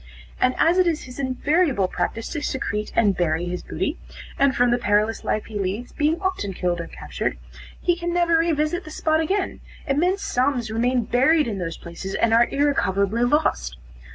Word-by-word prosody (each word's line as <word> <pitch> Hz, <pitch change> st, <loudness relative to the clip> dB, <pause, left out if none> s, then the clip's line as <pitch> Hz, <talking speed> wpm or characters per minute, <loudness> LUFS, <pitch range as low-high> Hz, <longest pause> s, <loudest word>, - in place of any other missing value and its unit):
And 255 Hz, 0 st, +2 dB
as 345 Hz, +3 st, +4 dB
it 365 Hz, -, +4 dB
is 325 Hz, -2 st, 0 dB
his 250 Hz, +1 st, -10 dB
invariable 275 Hz, -, +1 dB
practice 225 Hz, +6 st, -3 dB
to 300 Hz, -, -4 dB
secrete 210 Hz, -7 st, -3 dB
and 205 Hz, -4 st, +3 dB
bury 170 Hz, -1 st, 0 dB
his 180 Hz, 0 st, -4 dB
booty, 300 Hz, -, -3 dB, 0.4 s
and 275 Hz, -2 st, +3 dB
from 245 Hz, 0 st, +3 dB
the 240 Hz, -, +2 dB
perilous 210 Hz, 0 st, +1 dB
life 215 Hz, -, -1 dB
he 210 Hz, -2 st, -6 dB
leads, 200 Hz, +6 st, -3 dB
being 310 Hz, +3 st, 0 dB
often 370 Hz, -, -2 dB
killed 175 Hz, -1 st, -1 dB
or 170 Hz, -, -7 dB
captured, -, -, -4 dB, 0.4 s
he 350 Hz, -, +1 dB
can 345 Hz, 0 st, -3 dB
never 340 Hz, -1 st, +3 dB
re 335 Hz, +1 st, +2 dB
visit 310 Hz, +4 st, 0 dB
the -, -, -10 dB
spot 315 Hz, 0 st, +1 dB
again; 380 Hz, +5 st, -1 dB, 0.3 s
immense 350 Hz, +7 st, +1 dB
sums 250 Hz, -3 st, 0 dB
remain 245 Hz, +2 st, +1 dB
buried 275 Hz, +7 st, +3 dB
in 205 Hz, -4 st, -3 dB
those 165 Hz, -2 st, -4 dB
places, 170 Hz, +3 st, -7 dB
and 230 Hz, -1 st, +2 dB
are 235 Hz, +1 st, +5 dB
irrecoverably 230 Hz, -6 st, +1 dB
lost. -, -, 0 dB
250 Hz, 185 wpm, -23 LUFS, 205-315 Hz, 0.4 s, are